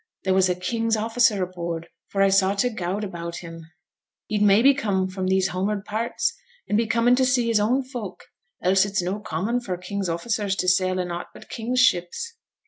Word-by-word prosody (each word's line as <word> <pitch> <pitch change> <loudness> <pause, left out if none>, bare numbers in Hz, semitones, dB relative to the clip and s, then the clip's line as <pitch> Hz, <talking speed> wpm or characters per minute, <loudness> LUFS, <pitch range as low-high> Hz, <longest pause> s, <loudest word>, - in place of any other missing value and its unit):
There 190 - +2
was 190 -1 +3
a 180 - +1
king's 225 +5 -1
officer 225 -2 +2
aboard, 170 -2 -5 0.2
for 195 -1 +1
I 195 - +5
saw 195 0 +3
t' 245 +5 +1
gowd 200 -2 -3
about 170 -3 -5
him.' 165 -1 -9 0.6
'He'd 210 -1 -2
maybe 210 +7 +6
come 200 -8 0
from 185 0 -4
these 190 0 +2
hom'ard 200 +2 -2
parts, 225 +3 -1 0.3
and - - 0
be 225 +1 +2
comin' 235 +3 +3
to 260 - +3
see 250 -2 +2
his 230 -2 +2
own 245 +6 +2
folk; 240 -8 -7 0.4
else 190 +1 +4
it's 200 -2 -1
no 190 +4 -2
common 210 +6 -2
for 190 -7 -4
king's 190 +1 -4
officers 200 +3 -1
to 185 - -2
sail 185 0 +2
in 180 -1 -2
aught 175 0 -5
but - - -13
king's 245 +3 0
ships.' 255 - +1
195 Hz, 200 wpm, -24 LUFS, 185-230 Hz, 0.6 s, maybe